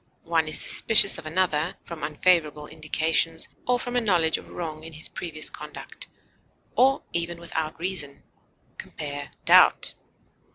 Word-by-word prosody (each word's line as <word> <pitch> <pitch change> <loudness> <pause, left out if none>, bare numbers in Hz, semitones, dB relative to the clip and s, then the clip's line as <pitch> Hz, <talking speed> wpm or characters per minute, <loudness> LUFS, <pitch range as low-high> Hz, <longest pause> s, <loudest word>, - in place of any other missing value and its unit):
One 165 -1 0
is 155 - +2
suspicious 215 -3 +6
of 155 - -9
another 165 -1 -1
from 165 -2 -9
unfavorable 150 -1 0
indications 160 +1 0 0.2
or 250 0 +2
from 245 0 -6
a 245 - +2
knowledge 175 -7 +1
of - - -15
wrong 155 -2 -7
in 165 0 -10
his 155 - -2
previous 155 -3 -3
conduct, - - -9 0.7
or 270 +2 +3
even 170 0 -3
without 160 -2 -5
reason. 170 -6 -4 0.6
Compare 145 -1 -7 0.2
DOUBT. - - +5
165 Hz, 135 wpm, -24 LUFS, 155-180 Hz, 0.7 s, suspicious